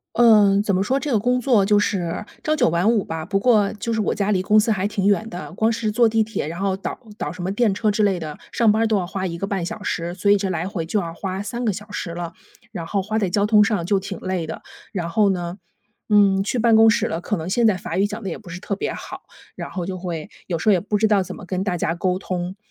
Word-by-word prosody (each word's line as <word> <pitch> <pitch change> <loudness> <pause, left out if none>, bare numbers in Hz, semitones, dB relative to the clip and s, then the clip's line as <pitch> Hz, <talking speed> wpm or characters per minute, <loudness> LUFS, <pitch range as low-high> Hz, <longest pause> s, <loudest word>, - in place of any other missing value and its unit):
嗯， 210 -4 +6
怎 200 -3 0
么 190 - +2
说， 265 +6 +1
这 290 -1 -3
个 225 - +4
工 250 +4 +1
作 225 -6 +3
就 205 0 +4
是 185 -2 -1 0.2
朝 310 0 +1
九 250 - +3
晚 175 +7 +2
五 215 -4 +1
吧， 160 0 -5
不 195 +1 0
过 210 -4 +3
就 230 +2 -4
是 220 - -1
我 210 - +1
家 205 -1 -1
离 185 -2 +1
公 215 +2 +5
司 220 +1 +2
还 195 -1 0
挺 200 -1 -1
远 210 +2 +2
的， 175 -3 -7
光 220 +3 +1
是 225 -2 -1
坐 235 +1 +4
地 225 0 +2
铁， 215 -8 -4
然 170 +3 -6
后 195 -1 0
倒 195 - -5 0.2
倒 - - -3
什 180 - -8
么 185 +2 -2
电 210 -1 +2
车 215 +2 0
之 210 +1 +1
类 195 -3 +2
的， 155 -2 -6
上 225 -3 +3
班 220 +2 +2
儿 - - +3
都 220 -1 +2
要 180 -3 0
花 190 0 -3
1 170 -1 -4
个 195 - -2
半 190 -4 -2
小 - - -6
时， 170 +1 -3
所 200 +2 0
以 205 - +6
这 195 -1 -2
来 170 +2 -2
回 170 -4 -4
就 205 +5 0
要 165 -3 -4
花 190 0 -4
3 235 +4 -4
个 210 - +1
小 210 +3 -9
时 175 -4 -5
了， 170 0 -5 0.4
然 170 -6 -5
后 195 +2 -1
花 215 +3 -2
在 200 -4 +1
交 200 +3 +1
通 210 -1 +6
上 200 -4 0
就 200 -1 +2
挺 195 -2 -6
累 185 -3 -2
的。 160 - -7 0.3
然 175 -5 -3
后 200 +2 +3
呢， 175 0 -4 0.5
嗯， 200 -2 +4
去 240 +4 -1
办 230 -1 +4
公 225 0 +7
室 235 -2 +1
了， 165 - -3
可 210 - -2
能 165 +1 -5
现 235 +4 +2
在 210 -4 +4
法 175 -1 -5
语 200 - +3
讲 215 +2 -5
得 195 - -4
也 - - -4
不 175 - -14
是 180 +1 -6
特 200 - -3
别 - - -3
好， - - -8 0.3
然 - - -7
后 180 - -3
就 185 +1 -4
会 170 -4 -5 0.2
有 170 -3 -2
时 215 - +1
候 - - +7
也 180 - +3
不 210 +2 -3
知 215 +1 +3
道 200 -3 +3
怎 185 0 -8
么 - - -11
跟 185 +1 -2
大 180 -3 -1
家 165 0 -1
沟 185 +1 0
通， 180 0 -4
200 Hz, 310 characters per minute, -22 LUFS, 180-215 Hz, 0.5 s, 公